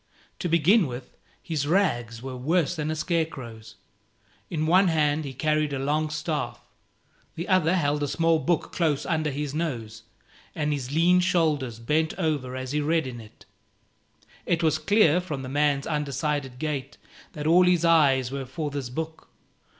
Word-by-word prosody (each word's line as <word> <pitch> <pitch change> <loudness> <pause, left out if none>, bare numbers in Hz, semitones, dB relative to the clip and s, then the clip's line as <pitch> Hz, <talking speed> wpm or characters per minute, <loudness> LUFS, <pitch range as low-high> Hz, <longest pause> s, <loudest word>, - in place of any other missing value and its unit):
To 175 - -2
begin 170 +4 +4
with, 125 0 -8 0.3
his 150 -4 -2
rags 120 - 0
were 130 -1 -5
worse 160 +6 0
than 155 -2 -3
a 155 - -1
scarecrow's. 135 -9 -3 0.7
In 155 -2 -1
one 185 +4 +5
hand 155 -2 +1
he 135 - -6
carried 155 0 0
a - - -1
long 150 +3 0
staff; 150 0 -3 0.8
the 170 - -5
other 185 -2 +3
held 145 -4 0
a 145 - 0
small 165 +1 +2
book 170 +1 -1
close 155 -4 0
under 155 -3 0
his 145 0 -4
nose, 120 -9 -4 0.5
and 150 -1 0
his 135 -2 -4
lean 175 +4 +4
shoulders 155 - +1
bent 155 +8 0
over 150 -8 -1
as 130 0 -5
he 150 +1 0
read 160 +1 +1
in 120 -2 -7
it. 110 -1 -17 1.0
It 170 -1 +1
was 155 -1 +2
clear, 180 -1 +4
from 150 -7 -5
the 130 - -6
man's 145 0 +1
undecided 145 -3 -2
gait, 140 -1 -4 0.4
that 150 -1 -6
all 175 +3 +5
his 175 -2 +3
eyes 135 -6 +4
were 135 -1 -4
for 150 +3 -4
this 140 -3 -4
book. 160 +5 -6
150 Hz, 165 wpm, -26 LUFS, 135-165 Hz, 1.0 s, one